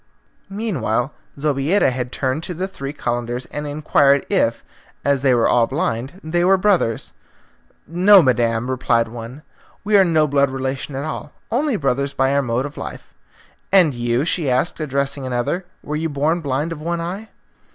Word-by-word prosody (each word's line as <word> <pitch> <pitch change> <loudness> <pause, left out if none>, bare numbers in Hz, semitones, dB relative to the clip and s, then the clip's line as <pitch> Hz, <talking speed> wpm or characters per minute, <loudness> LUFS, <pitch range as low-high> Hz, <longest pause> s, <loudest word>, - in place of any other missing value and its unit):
Meanwhile 180 - -1 0.2
Zobeida 145 +3 +2
had 125 -1 -4
turned 130 +3 -1
to 180 - -4
the 185 +3 -2
three 140 -7 -6
Calenders 120 -3 -3
and 150 0 -4
inquired 145 -1 +2
if, - - +1 0.4
as 140 -2 +2
they 130 -2 +4
were 115 - +3
all 120 -1 +3
blind, 130 +11 -3
they 175 +2 0
were 190 +2 +5
brothers. 185 - +1 0.7
"No, 185 +3 +6
madam," 120 -2 +1
replied 120 -3 +1
one, 120 +5 -9 0.4
"we 210 +1 +1
are 195 - +7
no 160 -4 +3
blood 140 -1 +2
relations 135 +1 -4
at 140 - -3
all, 155 -1 -6 0.2
only 270 +2 +1
brothers 140 -3 -1
by 135 +1 +2
our 140 - +3
mode 125 0 -1
of 145 - -8
life." - - -8 0.6
"And 180 -7 +5
you," 120 +3 0
she 165 -4 0
asked, 130 +8 +1
addressing 140 -2 -2
another, 125 +9 -2 0.2
"were 150 - -4
you 160 +1 -1
born 155 +4 0
blind 145 +3 -2
of 160 -2 -6
one 170 +2 -2
eye?" 190 +6 -5
140 Hz, 170 wpm, -20 LUFS, 130-170 Hz, 0.7 s, are